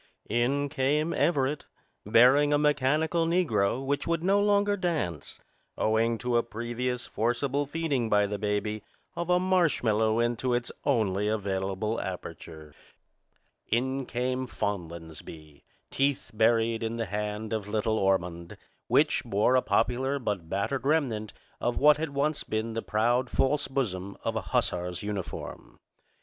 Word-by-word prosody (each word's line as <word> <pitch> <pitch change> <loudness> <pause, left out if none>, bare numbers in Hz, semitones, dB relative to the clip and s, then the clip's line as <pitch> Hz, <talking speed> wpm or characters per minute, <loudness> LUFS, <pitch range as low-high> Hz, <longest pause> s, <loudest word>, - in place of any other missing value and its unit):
In 130 +5 +1
came 145 +4 0
Everett, 145 -1 +1 0.4
bearing 130 +7 +5
a 145 - +4
mechanical 150 +3 +2
negro 130 - +1
which 140 +1 -1
would 165 0 0
no 195 +2 +3
longer 205 0 +3
dance, 160 - -3 0.4
owing 115 +1 +1
to 125 +1 0
a - - +4
previous 120 +2 -4
forcible 130 +5 -1
feeding 145 -7 -1
by 105 -1 +4
the 100 0 -4
baby 105 0 -1 0.3
of 170 0 -4
a 180 0 +4
marshmallow 125 - +2
into 120 +1 +1
its 120 0 -2
only 105 -7 +1
available 100 +1 -1
aperture. 80 -4 -8 0.9
In 130 +3 -1
came 125 +1 -2
Fonlansbee, 80 -7 -6 0.3
teeth 135 -4 0
buried 115 +1 +2
in 115 0 -2
the 115 - -1
hand 105 +1 -4
of 105 -2 -3
little 110 +1 0
Ormond, 90 -3 -1 0.3
which - - +3
bore 105 +6 +2
a 130 - +4
popular 125 +6 +1
but 100 -10 -3
battered 110 +9 -1
remnant 130 -8 0 0.3
of 120 - -1
what 150 +1 +6
had 160 0 -2
once 140 +2 -1
been 110 +1 -3
the 115 - -2
proud 120 +4 +1
false 145 +2 +1
bosom 100 -8 -3
of - - -2
a - - -1
hussar's 90 +1 -1
uniform. 100 -3 -6
120 Hz, 135 wpm, -28 LUFS, 105-140 Hz, 0.9 s, what